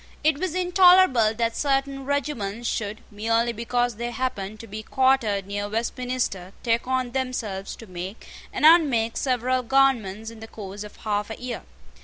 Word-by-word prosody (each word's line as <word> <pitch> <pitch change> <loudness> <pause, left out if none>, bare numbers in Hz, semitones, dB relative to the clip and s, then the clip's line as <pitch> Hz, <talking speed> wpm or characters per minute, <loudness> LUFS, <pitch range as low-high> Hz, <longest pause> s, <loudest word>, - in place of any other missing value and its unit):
It 305 -1 +3
was 365 -1 -2
intolerable 360 - +5
that 230 0 0
certain 275 -1 0
regiments 240 -6 -2
should, 210 0 -3
merely 230 +3 +1
because 240 0 -1
they 240 +1 -3
happened 215 -5 -3
to - - -9
be 215 0 -7
quartered 240 -5 +2
near 205 +1 -3
Westminster, 230 -4 -2
take 230 0 +1
on 255 -1 0
themselves 235 -7 -3
to 225 - -12
make 185 +2 -7 0.2
and - - 0
unmake 275 -9 +5
several 255 0 +1
governments 230 -5 +1
in 230 - -12
the 225 - -9
course 205 -2 -8
of 210 - -11
half 210 -1 -2
a 220 - -7
year. 245 -1 -5
235 Hz, 160 wpm, -25 LUFS, 210-265 Hz, 0.2 s, intolerable